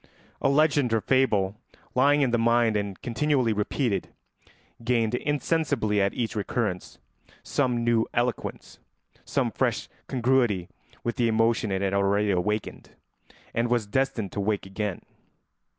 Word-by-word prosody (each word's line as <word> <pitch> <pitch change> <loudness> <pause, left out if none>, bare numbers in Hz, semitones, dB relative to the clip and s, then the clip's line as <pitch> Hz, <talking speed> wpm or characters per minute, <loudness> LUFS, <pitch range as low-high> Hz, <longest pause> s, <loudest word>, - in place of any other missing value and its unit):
A - - +3
legend 145 -3 +3
or 110 - +2
fable 105 -5 +2 0.4
lying 145 +3 +4
in 130 -3 +2
the 120 - +2
mind 115 -1 +3
and 100 -2 -2
continually 130 -1 +1
repeated 105 -1 -1 0.7
gained 115 -2 +1
insensibly 145 -6 0
at 100 0 0
each 115 -2 -2
recurrence 105 -2 -2 0.5
some 125 -4 0
new 115 -1 +2
eloquence, 120 0 -3 0.5
some - - 0
fresh - - -1 0.2
congruity 120 -8 +1 0.3
with 120 +2 -2
the 120 -2 +2
emotion 115 -1 +2
it 95 0 -1
had 95 0 0
already 100 +1 +2
awakened, 100 +3 -2 0.6
and 115 +1 0
was 120 -3 +1
destined 115 -2 -1
to - - -4
awake 100 0 -1
again. 95 -1 -4
115 Hz, 135 wpm, -26 LUFS, 100-125 Hz, 0.7 s, lying